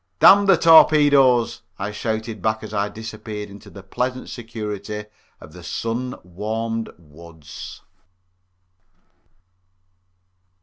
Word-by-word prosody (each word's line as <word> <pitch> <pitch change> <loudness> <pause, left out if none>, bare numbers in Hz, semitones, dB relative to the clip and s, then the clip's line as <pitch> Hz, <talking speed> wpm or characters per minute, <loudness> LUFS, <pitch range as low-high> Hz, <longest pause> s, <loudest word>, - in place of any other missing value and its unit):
"Damn 200 +1 +7
the 195 -3 +6
torpedoes!" 140 -7 +5 0.2
I 100 +2 -4
shouted 110 0 -4
back 110 +2 -1
as 110 - -8
I 105 0 -1
disappeared 110 -1 -8
into 100 +1 -13
the 100 -1 -12
pleasant 125 +6 -3
security 105 -3 -6 0.3
of 75 - -14
the 90 - -12
sun 115 +7 -4
warmed 110 +5 -4
woods. 80 -1 -12
110 Hz, 100 wpm, -21 LUFS, 100-120 Hz, 0.3 s, Damn